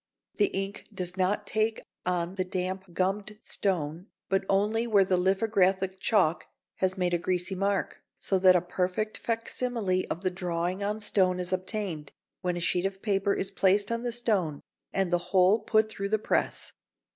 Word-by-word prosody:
The 205 - +4
ink 195 +1 -4
does 185 -2 -3
not 195 +2 0
take 220 +2 0 0.3
on 175 0 0
the 190 -1 -1
damp 185 0 -4
gummed 195 +4 -1
stone, 175 -4 -2 0.2
but 195 0 +1
only 210 +4 +2
where 205 -4 +5
the 185 - +2
lithographic 190 0 +2
chalk 190 -6 +2 0.3
has 185 0 0
made 180 -1 0
a 175 - +2
greasy 180 +2 -1
mark, 195 +1 -1 0.2
so 190 - 0
that 185 -1 +7
a 180 - +4
perfect 185 +4 -2
facsimile 230 -4 -1
of 170 - -4
the 185 - +1
drawing 180 +1 -2
on 210 +2 -1
stone 185 -3 +2
is 180 +1 -3
obtained, 185 -5 -2 0.3
when 180 -1 -1
a - - -2
sheet 175 +2 +1
of 195 0 -9
paper 200 -1 +1
is 195 - -2
placed 200 +2 +2
on 230 0 -1
the 240 0 -2
stone 200 -11 0 0.3
and 195 -2 0
the 175 - +4
whole 190 +3 +5
put 220 0 +2
through 200 -2 -4
the 215 - +3
press. 215 - -1
190 Hz, 175 wpm, -28 LUFS, 180-205 Hz, 0.3 s, that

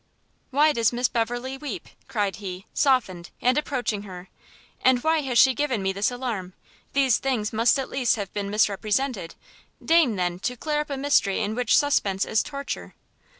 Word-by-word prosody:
"Why 295 +3 +4
does 230 -4 +2
Miss 245 +1 +1
Beverley 245 +3 -2
weep?" 295 - -6 0.2
cried 205 -5 -1
he, 190 -2 -7
softened, 210 - +1
and 250 +1 +2
approaching 255 -8 -1
her, 185 -2 -10 0.5
"and 255 -1 +3
why 320 0 +3
has 260 -4 -1
she 265 +2 +7
given 260 -7 -1
me 190 0 0
this 200 +2 +1
alarm? 235 -8 -4 0.4
these 265 -4 +3
things 240 -6 -1
must 230 +5 +3
at 270 - -3
least 250 -3 +1
have 200 -4 -6
been 200 -1 -3
misrepresented, 210 0 0 0.5
deign, 320 -9 +4
then, 180 -1 -1
to 250 +5 -3
clear 300 +3 -1
up 300 - -7
a 280 - -3
mystery 270 -8 +2
in 210 - -1
which 245 -2 +2
suspense 205 -9 +1
is 220 - +1
torture!" 280 -1 -6
240 Hz, 175 wpm, -25 LUFS, 200-270 Hz, 0.5 s, she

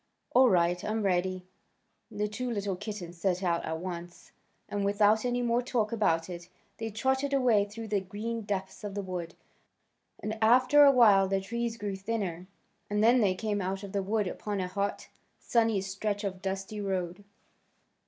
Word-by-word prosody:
"All 255 0 +6
right; 175 -2 +2
I'm 215 +1 -1
ready." 185 -1 0 0.6
The 210 +1 -2
two 245 +4 -4
little 200 -4 -2
kittens 180 -4 -7
set 185 +1 0
out 170 -2 +1
at 160 0 -3
once, 175 0 -7 0.4
and 205 -1 -2
without 205 +3 +3
any 245 0 0
more 240 0 +2
talk 235 -4 -1
about 165 -8 +1
it. 175 -1 -8 0.3
They 225 0 -3
trotted 265 +5 0
away 235 -6 +4
through 220 +2 -8
the 205 -2 +1
green 220 +4 -4
depths 195 -2 -4
of 205 -1 -5
the 200 - -2
wood, 180 -3 -5 0.8
and 215 +1 -4
after 255 +6 +6
a 280 - +8
while 210 -7 +6
the 195 0 +1
trees 230 +3 -3
grew 205 -3 -3
thinner, 190 -4 -3 0.4
and 210 +1 +1
then 240 +2 +5
they 190 -3 +2
came 205 0 -2
out 190 +2 -3
of 200 - -7
the 200 - 0
wood 210 +2 0
upon 205 +2 -4
a 185 - -1
hot, 200 +2 -3 0.3
sunny 225 -4 +1
stretch 200 +2 -3
of 190 -2 -4
dusty 195 +2 -4
road. 185 -1 -3
205 Hz, 175 wpm, -29 LUFS, 185-225 Hz, 0.8 s, a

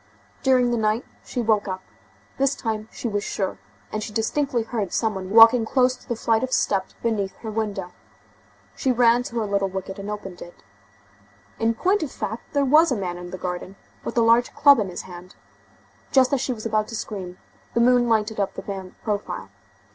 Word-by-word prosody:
During 255 -2 +3
the 235 - +1
night 215 +2 +1 0.2
she 245 - -3
woke 215 -2 +2
up; 185 0 -4 0.6
this 275 +1 +2
time 220 -2 -3
she - - -5
was 205 -2 -1
sure, 195 -3 -3 0.3
and 215 - -2
she 215 - -5
distinctly 235 +3 0
heard 220 -5 -3
some 220 -2 0
one 190 -1 -6
walking 225 +3 +8
close 255 +2 +2
to - - -21
the 240 - 0
flight 225 0 +1
of 260 - -2
steps 195 -6 0
beneath 210 -4 -1
her 220 - -5
window. 205 -4 -3 0.8
She 265 - +1
ran 240 0 +4
to 240 - -7
her 225 - 0
little 200 -1 0
wicket 190 +1 -6
and 200 +1 -6
opened 195 -4 -6
it. 175 - -12 1.0
In 225 0 +1
point 380 - +2
of 300 -5 -3
fact, 220 +1 -6
there 285 -1 +2
was 305 +4 +5
a - - +2
man 175 -3 -4
in 175 0 -8
the 185 - -6
garden, 180 +1 -5 0.3
with - - -5
a - - +5
large 230 +1 +4
club 285 -3 +7
in 200 -3 -1
his 175 - -6
hand. 180 0 -11 0.8
Just 265 0 +4
as 270 - +2
she 265 - -1
was 225 -3 -6
about 215 -1 +1
to 225 - -6
scream, 185 -5 -6 0.4
the - - +3
moon 245 0 +4
lighted 220 -1 +1
up 200 - -1
the - - -6
man's 190 -2 -6
profile. 210 -2 -3
220 Hz, 205 wpm, -24 LUFS, 195-245 Hz, 1.0 s, walking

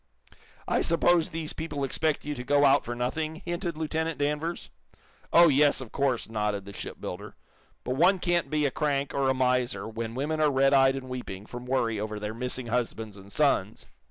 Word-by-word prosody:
"I - - +1
suppose 170 0 +3
these 160 -2 -4
people 150 -3 -4
expect 155 +2 -1
you 150 - -2
to 125 -3 -6
go 145 +3 +3
out 140 +1 +5
for 120 - -5
nothing," 155 +6 -2
hinted 175 -1 -3
Lieutenant 160 +1 -2
Danvers. 150 +4 -2 0.6
"Oh, 170 0 +8
yes, 145 0 +4
of 130 -4 -8
course," 135 -4 0
nodded 105 -3 -2
the 100 - -9
shipbuilder. - - -7 0.5
"But 125 +1 -2
one 180 +5 +5
can't 175 -1 0
be 150 -1 +1
a 140 - +1
crank, 140 -1 -1
or 135 -1 +1
a 130 - +2
miser, 125 -6 0
when 115 +1 -5
women 155 +4 -1
are 150 - +4
red 135 0 +3
eyed 135 -1 +5
and 135 -1 -6
weeping 120 -6 -6
from 120 +2 -8
worry 115 -4 0
over 105 0 -4
their 105 +1 -4
missing 125 +1 -3
husbands 115 -3 -2
and 100 0 -13
sons." 125 -8 +1
135 Hz, 190 wpm, -27 LUFS, 120-155 Hz, 0.6 s, Oh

